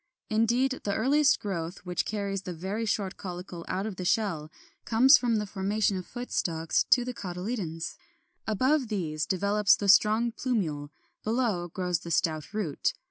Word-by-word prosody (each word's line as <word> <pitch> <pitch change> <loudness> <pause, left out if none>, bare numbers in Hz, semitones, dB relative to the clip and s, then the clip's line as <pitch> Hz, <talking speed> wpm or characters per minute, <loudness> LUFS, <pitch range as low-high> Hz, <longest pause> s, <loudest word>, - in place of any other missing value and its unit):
Indeed, 240 +4 +2
the 200 - -1
earliest 280 +5 +3
growth 180 -2 -5
which 180 -1 -1
carries 200 -2 -2
the 180 -2 -6
very 200 +7 -3
short 195 -3 -1
caulicle 180 -2 -7
out 190 +2 -2
of 210 -4 -5
the 185 - -4
shell 175 -6 0 0.3
comes 245 +4 +6
from 240 -2 +2
the 210 -1 0
formation 200 +1 0
of 185 -1 -5
foot 245 0 -7
stalks 165 -1 0
to 245 -2 +4
the 250 - -4
cotyledons; 180 -4 -4 0.5
above 260 +5 +2
these 160 -8 -2
develops 200 +2 +3
the 205 - -3
strong 215 +4 +5
plumule, 175 - -2 0.3
below 220 -6 0
grows 180 0 -2
the 170 - -9
stout 155 -2 0
root. 200 -9 -1
200 Hz, 160 wpm, -28 LUFS, 175-225 Hz, 0.5 s, comes